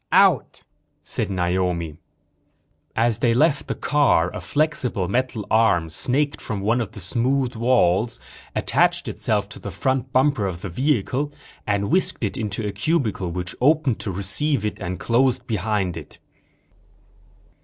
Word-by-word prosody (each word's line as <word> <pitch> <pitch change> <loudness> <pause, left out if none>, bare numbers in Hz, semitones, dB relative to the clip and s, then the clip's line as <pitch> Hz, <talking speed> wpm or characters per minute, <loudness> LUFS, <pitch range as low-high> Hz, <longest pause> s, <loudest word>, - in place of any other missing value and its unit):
"Out," - - +3 0.4
said - - -2
Naomi. 90 -3 -1 1.0
As 115 -1 +1
they 115 -2 +2
left 145 +2 +2
the - - -2
car, 135 - +2
a - - -5
flexible 125 - 0
metal 120 0 -1
arm 90 -8 +3
snaked 140 - 0
from 105 -3 -4
one 115 +5 +1
of 115 - -5
the 110 - -8
smooth 125 +7 0
walls, 115 -2 +2 0.4
attached - - +2
itself 105 -2 -1
to - - -10
the - - -6
front 130 +7 -1
bumper 130 -6 +2
of 90 -2 -5
the 95 - -5
vehicle, 135 - 0 0.4
and 100 +3 0
whisked 185 +2 +1
it - - -1
into 110 -3 -3
a 105 - -1
cubicle 105 - 0
which 90 +1 -4
opened 145 -3 +3
to 100 - 0
receive 100 - 0
it 105 - -3
and 90 -2 -4
closed 125 +2 +2
behind 105 -5 -1
it. - - -8
110 Hz, 145 wpm, -23 LUFS, 95-130 Hz, 1.0 s, Out